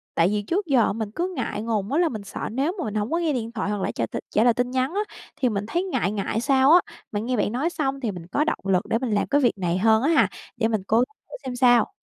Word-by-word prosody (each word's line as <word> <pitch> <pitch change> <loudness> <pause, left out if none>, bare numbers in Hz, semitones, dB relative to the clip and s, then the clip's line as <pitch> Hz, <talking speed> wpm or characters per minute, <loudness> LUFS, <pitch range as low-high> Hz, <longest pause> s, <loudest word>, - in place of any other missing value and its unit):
Tại 165 - +4
vì 210 +2 0
trước 360 - -1
giờ 255 - +3
mình 220 -1 -4
cứ 360 +8 -2
ngại 225 -4 -3
ngùng 220 -2 -2
á, 300 - +2
là 340 -3 +3
mình 215 -4 -6
sợ 195 - -5
nếu 275 +8 0
mà 345 - -1
mình 215 0 -4
hổng 210 +5 -1
có 335 - +2
nghe 330 -4 0
điện 230 -2 -3
thoại 220 -3 -3
hoặc 205 -1 -2
là - - -1
trả 115 - -2
t - - -17 0.2
trả 215 - +2
lời 240 -1 +5
tin 245 +1 -1
nhắn 260 +4 0
á, 410 - +1 0.3
thì 250 - +1
mình 205 -1 -2
thấy 345 +10 0
ngại 210 - -1
ngại 210 +2 -2
sao 270 +2 +4
á. 350 - +9 0.3
Mà 205 - -1
nghe 245 +2 -1
bạn 210 - +1
nói 275 +9 0
xong 275 -5 -2
thì 230 -6 -2
mình 175 -2 -9
có 285 +11 +1
động 315 - -1
lực 190 -1 +2
để 225 - +2
mình 255 -4 -2
làm 205 - +1
cái 285 +1 +2
việc 240 -5 +2
này 180 -1 0
hơn 220 +3 +4
á 295 - +2
ha, 275 - +5 0.3
để 225 - +2
mình 220 -4 -1
cố 220 - +3
gắng 245 - +4 0.2
thử - - -8
xem 255 - -4
sao. 245 - +4
235 Hz, 310 wpm, -24 LUFS, 210-275 Hz, 0.3 s, á